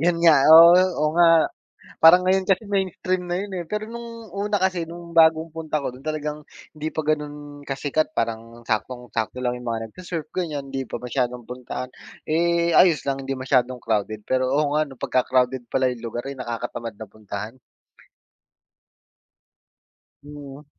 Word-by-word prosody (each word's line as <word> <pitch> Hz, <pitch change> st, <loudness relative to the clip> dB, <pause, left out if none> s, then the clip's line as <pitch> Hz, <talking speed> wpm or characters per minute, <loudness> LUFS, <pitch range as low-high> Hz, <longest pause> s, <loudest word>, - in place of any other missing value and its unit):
'yun 170 Hz, +2 st, +2 dB
nga, 150 Hz, -5 st, +6 dB
oo, 165 Hz, +2 st, +10 dB, 0.2 s
oh, 150 Hz, 0 st, +1 dB
nga. 165 Hz, -1 st, +5 dB, 0.6 s
Parang 170 Hz, +3 st, +9 dB
ngayon 190 Hz, +1 st, +2 dB
kasi 195 Hz, +3 st, 0 dB
mainstream 185 Hz, -2 st, -1 dB
na 175 Hz, +1 st, -2 dB
'yun, 205 Hz, -, -5 dB
eh, 175 Hz, -, -4 dB
pero 210 Hz, +5 st, -4 dB
no'ng 230 Hz, -1 st, -9 dB
una 205 Hz, 0 st, -1 dB
kasi 185 Hz, -2 st, 0 dB
no'ng 170 Hz, 0 st, -11 dB
bagong 160 Hz, 0 st, +5 dB
punta 155 Hz, -2 st, -2 dB
ko 140 Hz, -, -3 dB
do'n 125 Hz, +2 st, -10 dB
talagang 150 Hz, -1 st, -4 dB, 0.3 s
hindi 155 Hz, +1 st, -4 dB
pa -, -, -2 dB
gano'n 145 Hz, -1 st, -4 dB
kasikat 145 Hz, +3 st, -2 dB
parang 115 Hz, -1 st, -4 dB
saktong-sakto 120 Hz, +1 st, -3 dB
lang 125 Hz, -1 st, -1 dB
'yung 125 Hz, -, -10 dB
mga 115 Hz, -1 st, -2 dB
nag-se-surf 170 Hz, +3 st, -7 dB
ganiyan, 150 Hz, -6 st, -3 dB
hindi 135 Hz, 0 st, -4 dB
pa -, -, -6 dB
masyadong 125 Hz, -1 st, -3 dB
puntahan, 125 Hz, 0 st, -6 dB, 0.4 s
eh, 170 Hz, +1 st, +2 dB
ayos 170 Hz, -4 st, +5 dB
lang 135 Hz, 0 st, -2 dB
'di 135 Hz, -, -3 dB
masyadong 130 Hz, -1 st, +1 dB
crowded, 110 Hz, -1 st, -2 dB
pero 130 Hz, 0 st, +1 dB
oo, 145 Hz, +1 st, +2 dB
nga 155 Hz, -, +3 dB
ano 140 Hz, -, -12 dB
pagka-crowded 130 Hz, 0 st, +1 dB
pala 130 Hz, -, +2 dB
'yung 120 Hz, -2 st, -6 dB
lugar 120 Hz, +3 st, -5 dB
ay 140 Hz, -, -6 dB
nakakatamad 115 Hz, -2 st, -5 dB
na 110 Hz, -, -8 dB
puntahan. 105 Hz, +3 st, -8 dB, 2.6 s
Hmm. 145 Hz, 0 st, -11 dB
145 Hz, 160 wpm, -23 LUFS, 125-170 Hz, 2.6 s, oo